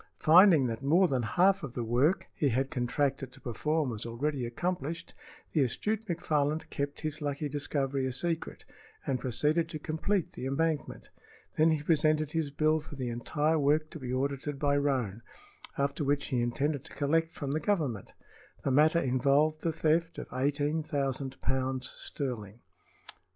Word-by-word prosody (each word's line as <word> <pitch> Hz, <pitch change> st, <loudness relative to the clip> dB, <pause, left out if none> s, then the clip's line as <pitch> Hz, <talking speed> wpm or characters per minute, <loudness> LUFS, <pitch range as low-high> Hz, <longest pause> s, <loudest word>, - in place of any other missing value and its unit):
Finding 165 Hz, -3 st, +7 dB
that 115 Hz, -1 st, -3 dB
more 170 Hz, +7 st, +4 dB
than 130 Hz, -5 st, 0 dB
half 185 Hz, -, +3 dB
of 135 Hz, -6 st, -7 dB
the 120 Hz, -, -2 dB
work 125 Hz, +10 st, +2 dB
he 145 Hz, -, +1 dB
had 130 Hz, +3 st, 0 dB
contracted 135 Hz, +1 st, -1 dB
to 135 Hz, -, -15 dB
perform 150 Hz, +3 st, -1 dB
was 110 Hz, -2 st, -5 dB
already 125 Hz, +2 st, -2 dB
accomplished, 165 Hz, +4 st, -3 dB, 0.4 s
the 155 Hz, -, +3 dB
astute 215 Hz, -, -1 dB
McFarland 155 Hz, -3 st, 0 dB
kept 140 Hz, 0 st, -3 dB
his 155 Hz, -1 st, -3 dB
lucky 145 Hz, +1 st, -2 dB
discovery 140 Hz, -2 st, -1 dB
a -, -, -2 dB
secret 165 Hz, +5 st, -3 dB, 0.4 s
and 130 Hz, -2 st, 0 dB
proceeded 150 Hz, +7 st, 0 dB
to 155 Hz, -, -4 dB
complete 160 Hz, +5 st, -1 dB
the 130 Hz, -, -5 dB
embankment. 150 Hz, +1 st, -2 dB, 0.4 s
Then 155 Hz, +1 st, +4 dB
he 155 Hz, -2 st, 0 dB
presented 155 Hz, -1 st, +2 dB
his 160 Hz, -2 st, -1 dB
bill 155 Hz, +2 st, +2 dB
for 150 Hz, -1 st, -10 dB
the 130 Hz, -3 st, -3 dB
entire 150 Hz, +7 st, 0 dB
work 150 Hz, +2 st, +2 dB
to 160 Hz, -, -8 dB
be 125 Hz, -2 st, -5 dB
audited 140 Hz, +2 st, -2 dB
by 145 Hz, 0 st, +1 dB
Roane, 130 Hz, -7 st, 0 dB, 0.6 s
after 140 Hz, +2 st, 0 dB
which 145 Hz, 0 st, 0 dB
he 125 Hz, -2 st, +1 dB
intended 140 Hz, +4 st, -1 dB
to -, -, -11 dB
collect 165 Hz, +3 st, +1 dB
from 140 Hz, -4 st, -4 dB
the 155 Hz, -, 0 dB
Government. 150 Hz, -, -1 dB, 0.5 s
The 135 Hz, -, 0 dB
matter 155 Hz, +5 st, +5 dB
involved 140 Hz, +3 st, +2 dB
the 165 Hz, -, 0 dB
theft 165 Hz, +1 st, +1 dB
of -, -, -5 dB
eighteen 145 Hz, +4 st, 0 dB
thousand 135 Hz, -3 st, -2 dB
pounds 130 Hz, -1 st, 0 dB
sterling. 115 Hz, -5 st, -5 dB
145 Hz, 165 wpm, -30 LUFS, 130-155 Hz, 0.6 s, Finding